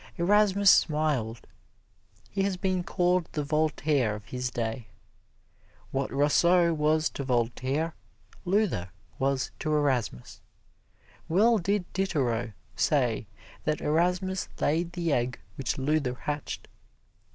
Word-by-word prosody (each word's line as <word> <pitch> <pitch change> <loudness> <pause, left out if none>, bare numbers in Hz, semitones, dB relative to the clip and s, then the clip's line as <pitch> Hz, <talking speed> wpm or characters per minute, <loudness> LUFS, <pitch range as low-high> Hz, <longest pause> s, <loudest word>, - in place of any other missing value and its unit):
Erasmus 200 +2 +5
smiled. 150 -8 +1 0.9
He 195 - -1
has 195 -1 0
been 185 -1 0
called 180 -1 +1
the 150 - -1
Voltaire 150 -5 +1
of 105 - -10
his 125 0 -3
day. 115 -1 -4 1.0
What 135 0 -2
Rousseau 170 +5 +4
was 155 0 +2
to 140 - -5
Voltaire, 130 +5 -1 0.5
Luther 185 - 0 0.3
was 135 0 0
to 155 - -2
Erasmus. 130 - -1 0.9
Well 215 +7 +4
did 200 +1 0
Diderot 125 - -1 0.2
say 125 -7 +1 0.4
that 155 0 0
Erasmus 180 +4 0
laid 170 +3 0
the 170 -4 0
egg 125 0 -1 0.2
which 135 - -2
Luther 135 -2 0
hatched. 145 +3 -5
150 Hz, 110 wpm, -28 LUFS, 130-180 Hz, 1.0 s, Erasmus